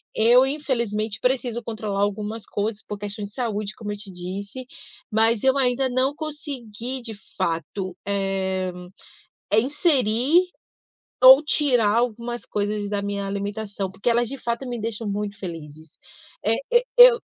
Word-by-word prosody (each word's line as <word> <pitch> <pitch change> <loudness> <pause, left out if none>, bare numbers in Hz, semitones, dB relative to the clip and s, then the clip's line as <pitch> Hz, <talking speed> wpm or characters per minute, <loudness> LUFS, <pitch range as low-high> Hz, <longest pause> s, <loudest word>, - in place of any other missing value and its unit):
Eu, 240 +4 +6
infelizmente, 235 -7 -1
preciso 250 -2 0
controlar 215 -3 -3
algumas 210 +2 -2
coisas, 210 +1 -3
por 210 - -7
questões 205 0 -4
de 200 - -20
saúde, 215 -4 -2
como 210 -2 -6
eu 205 - -5
te 205 -1 -8
disse, 195 +7 -6 0.5
mas 225 0 +3
eu 265 +1 +4
ainda 260 0 +2
não 260 +3 +1
consegui 265 -6 -5
de 230 -2 -7 0.2
fato, 180 +1 -2
eh, 190 -2 -1 0.8
é 210 +2 +5
inserir, 280 - +2 0.7
ou 260 +3 +10
tirar 245 -8 +3
algumas 240 0 -2
coisas 205 0 -2
da 205 -1 -1
minha 200 0 -3
alimentação, 200 -1 -4
porque 195 +5 -1
elas, 235 0 +2
de 275 - -4
fato, 235 +2 -3
me 245 -2 -4
deixam 225 0 -3
muito 205 0 -3
felizes. 160 -3 -9 0.5
Eh, 220 +2 +3 0.2
eu 480 0 +5
eu - - +9
220 Hz, 145 wpm, -23 LUFS, 200-250 Hz, 0.8 s, ou